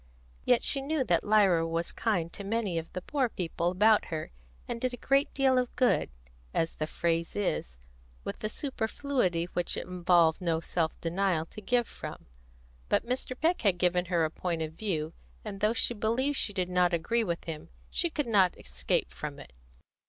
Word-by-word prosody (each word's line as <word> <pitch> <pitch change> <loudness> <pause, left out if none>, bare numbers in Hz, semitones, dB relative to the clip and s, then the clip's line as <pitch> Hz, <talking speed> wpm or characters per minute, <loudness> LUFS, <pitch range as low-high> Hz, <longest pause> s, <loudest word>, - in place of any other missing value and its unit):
Yet 245 - +4
she 275 - +2
knew 290 0 0
that 175 -8 +2
Lyra 195 -6 +4
was 165 +1 -2
kind 175 -7 -1
to 200 - -7
many 200 -4 -1
of 165 - -9
the 185 - -5
poor 270 -4 0
people 170 -3 -1
about 210 +4 +4
her, 155 -2 -5 0.4
and 230 - -4
did 255 -1 -1
a - - -19
great 275 +3 +2
deal 265 -2 +4
of 250 -1 -3
good, 250 -2 +2 0.5
as 165 0 +1
the 155 - -2
phrase 165 0 -1
is, 65 - -2 0.5
with - - -5
the 215 - -2
superfluity 230 - -1
which 175 -1 0
it - - -3
involved 175 -2 +3
no 165 -2 +1
self 165 -1 -2
denial 170 -1 0
to 215 - -11
give 240 +2 +1
from. - - -8 0.6
But - - +2
Mr. 255 +1 -2
Peck 335 +3 +2
had 195 -6 +3
given 180 0 +2
her 170 -2 +2
a 155 - -3
point 165 -2 -2
of 155 0 -5
view, 165 -4 -2 0.3
and 195 - -5
though 210 +2 +2
she 240 - +3
believed 235 +6 0
she 215 - +1
did 185 -2 -2
not 180 -1 +3
agree 230 +8 +1
with 170 -5 -2
him, 165 0 -7 0.2
she 345 - +1
could 295 -3 -2
not 200 -6 +3
escape 65 -2 -1
from - - -6
it. - - -12
185 Hz, 190 wpm, -29 LUFS, 165-235 Hz, 0.6 s, Yet